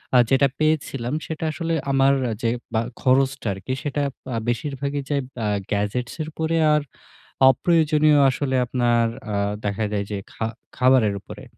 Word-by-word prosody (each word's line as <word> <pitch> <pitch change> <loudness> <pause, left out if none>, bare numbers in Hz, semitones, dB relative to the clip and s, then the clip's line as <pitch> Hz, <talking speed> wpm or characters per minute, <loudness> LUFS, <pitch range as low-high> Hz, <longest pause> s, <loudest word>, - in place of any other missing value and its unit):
আ - - +8
যেটা 135 +1 +4
পেয়েছিলাম 140 -5 0
সেটা 160 0 -4
আসলে 165 +2 -3 0.2
আমার 135 0 +4 0.3
যে 115 - +1 0.2
বা 110 - +2 0.2
খরচটা 135 -1 +2
আরকি 95 +7 -5
সেটা 145 0 -1 0.2
বা 130 -3 -4
বেশিরভাগই 140 +3 -2
যায় 145 -1 +1
বআ 115 -3 -2 0.2
গ্যাজেটস 105 +4 -1
এর 155 - -3
উপরে। 160 +1 -1 0.2
আর 150 - +3 0.7
অপ্রয়োজনীয় 155 0 +3
আসলে 130 0 -1
আপনার 120 -1 +2 0.3
আ - - 0 0.3
দেখা 105 +1 -1
যায় 100 -1 -1
যে 105 - -2
খা 110 - -3 0.3
খাবারের 125 -5 +4
উপরে। - - -11
135 Hz, 150 wpm, -23 LUFS, 120-150 Hz, 0.7 s, আ